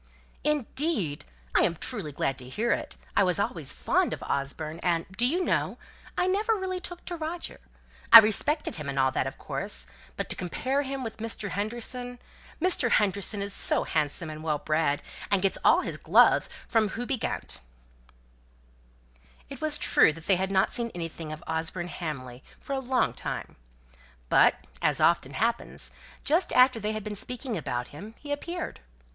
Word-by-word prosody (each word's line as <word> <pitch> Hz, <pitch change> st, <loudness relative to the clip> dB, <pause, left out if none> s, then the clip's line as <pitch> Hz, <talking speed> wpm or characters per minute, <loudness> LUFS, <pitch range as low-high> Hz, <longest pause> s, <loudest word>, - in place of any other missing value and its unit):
"Indeed! 285 Hz, -, 0 dB, 0.3 s
I -, -, +5 dB
am 170 Hz, -, +2 dB
truly 195 Hz, -, -4 dB
glad 135 Hz, -1 st, -1 dB
to 125 Hz, 0 st, -7 dB
hear 225 Hz, -, 0 dB
it. -, -, -2 dB, 0.2 s
I -, -, +4 dB
always 180 Hz, -2 st, +3 dB
was 165 Hz, -7 st, -2 dB
fond -, -, +1 dB
of -, -, -11 dB
Osborne; 150 Hz, +3 st, -2 dB
and, 170 Hz, -2 st, +1 dB
do 240 Hz, +4 st, +3 dB
you 355 Hz, +7 st, +1 dB
know, -, -, 0 dB, 0.4 s
I -, -, +2 dB
never 415 Hz, +4 st, +2 dB
really 375 Hz, -2 st, -3 dB
took 350 Hz, -2 st, -8 dB
to 350 Hz, -, -3 dB
Roger? 330 Hz, +1 st, -5 dB, 0.5 s
I -, -, +15 dB
respected 225 Hz, -, +4 dB
him 150 Hz, -2 st, -5 dB
and 135 Hz, -, -4 dB
all 130 Hz, 0 st, +3 dB
that, 130 Hz, -, 0 dB
of 135 Hz, -, -6 dB
course; -, -, -3 dB, 0.3 s
but -, -, -2 dB
to -, -, +3 dB
compare 260 Hz, +10 st, -1 dB
him 270 Hz, -1 st, -4 dB
with 225 Hz, -2 st, -5 dB
Mr. 220 Hz, -2 st, -4 dB
Henderson! 240 Hz, +4 st, -4 dB, 0.4 s
Mr. 340 Hz, -7 st, +2 dB
Henderson 200 Hz, 0 st, +1 dB
is 200 Hz, 0 st, -4 dB
so -, -, +2 dB
handsome 155 Hz, +1 st, 0 dB
and 155 Hz, 0 st, -8 dB
well 155 Hz, -2 st, 0 dB
bred, 155 Hz, -1 st, 0 dB, 0.3 s
and 200 Hz, -2 st, +2 dB
gets 195 Hz, -, +2 dB
all -, -, +6 dB
his -, -, -4 dB
gloves -, -, +5 dB, 0.2 s
from 220 Hz, -3 st, +2 dB
Houbigant!" 245 Hz, +4 st, -3 dB, 1.9 s
It 275 Hz, -, -8 dB
was 310 Hz, -1 st, +5 dB
true -, -, +5 dB
that 165 Hz, +1 st, -12 dB
they 190 Hz, -2 st, +4 dB
had 190 Hz, +1 st, -1 dB
not 190 Hz, -1 st, +2 dB
seen 235 Hz, -1 st, 0 dB
anything 165 Hz, -2 st, -5 dB
of 155 Hz, +2 st, -7 dB
Osborne 165 Hz, +2 st, -2 dB
Hamley 130 Hz, -8 st, -6 dB, 0.2 s
for 280 Hz, -, -5 dB
a 270 Hz, -, 0 dB
long 260 Hz, -1 st, +1 dB
time; -, -, -5 dB, 0.7 s
but, -, -, +6 dB, 0.3 s
as -, -, +2 dB
it -, -, +2 dB
often 155 Hz, -5 st, +3 dB
happens, 230 Hz, -, -1 dB, 0.3 s
just 330 Hz, +6 st, +3 dB
after 255 Hz, -2 st, +6 dB
they 215 Hz, 0 st, -2 dB
had 215 Hz, -1 st, -4 dB
been 210 Hz, 0 st, -4 dB
speaking 250 Hz, +3 st, -3 dB
about 125 Hz, -7 st, -3 dB
him 205 Hz, +10 st, -10 dB
he 290 Hz, -, -8 dB
appeared. 340 Hz, +4 st, -4 dB
210 Hz, 175 wpm, -28 LUFS, 160-265 Hz, 1.9 s, I